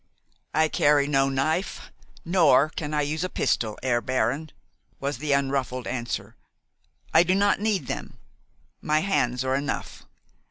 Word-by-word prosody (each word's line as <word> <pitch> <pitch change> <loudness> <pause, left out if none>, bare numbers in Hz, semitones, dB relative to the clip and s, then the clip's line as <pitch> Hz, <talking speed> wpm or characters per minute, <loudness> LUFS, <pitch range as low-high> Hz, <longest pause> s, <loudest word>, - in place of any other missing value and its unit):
"I 155 +1 +4
carry 145 -2 +3
no 135 -1 +2
knife, 155 +7 -2 0.3
nor 160 -5 +4
can 150 -1 -5
I 150 -1 +1
use 155 +3 -2
a 185 - -2
pistol, 110 -10 -1
Herr 120 -2 +1
Baron," 130 +4 -1 0.5
was 140 -2 -3
the 150 0 -2
unruffled 135 -2 -1
answer. 120 -1 -4 0.8
"I 160 - +7
do 180 +2 +2
not 200 0 +2
need 205 -8 0
them. - - -6 0.6
My 155 +1 +1
hands 130 -10 0
are 130 - 0
enough. 140 +1 -4
145 Hz, 145 wpm, -25 LUFS, 130-160 Hz, 0.8 s, I